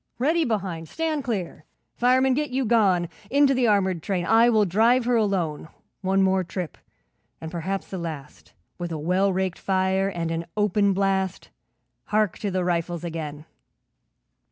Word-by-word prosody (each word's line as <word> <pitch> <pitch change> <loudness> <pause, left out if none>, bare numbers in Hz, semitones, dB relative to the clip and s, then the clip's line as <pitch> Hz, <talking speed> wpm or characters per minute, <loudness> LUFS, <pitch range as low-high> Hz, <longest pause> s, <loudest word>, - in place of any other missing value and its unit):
Ready 315 +7 +2
behind! 185 -8 -3
Stand 315 -3 -2
clear! 190 - -4 0.3
'Fireman, 255 +2 +3
get 295 +2 -1
you 260 +1 -1
gone 195 -7 +3 0.2
Into 280 +1 +4
the 250 -2 +2
armoured 190 -5 +2
train, 180 0 -2
I 225 +4 +5
will 215 -3 +4
drive 230 +7 +3
her 245 0 +2
alone; 185 -9 0 0.3
One 195 0 +2
more 190 0 +2
trip 180 -1 -6 0.6
and 160 0 -7
perhaps 185 +3 -3
the 190 - -6
last 155 -4 -8 0.3
With 175 -1 -4
a 160 - -3
well 180 +6 +1
raked 185 -1 -2
fire 190 0 +1
and 170 -3 -3
an 165 0 -3
open 205 -1 +2
blast 190 -1 -1 0.6
Hark 215 -3 0
to 205 - -2
the 185 -1 -1
rifles 175 -1 -1
again.' 155 -3 -5
190 Hz, 155 wpm, -24 LUFS, 175-225 Hz, 0.6 s, I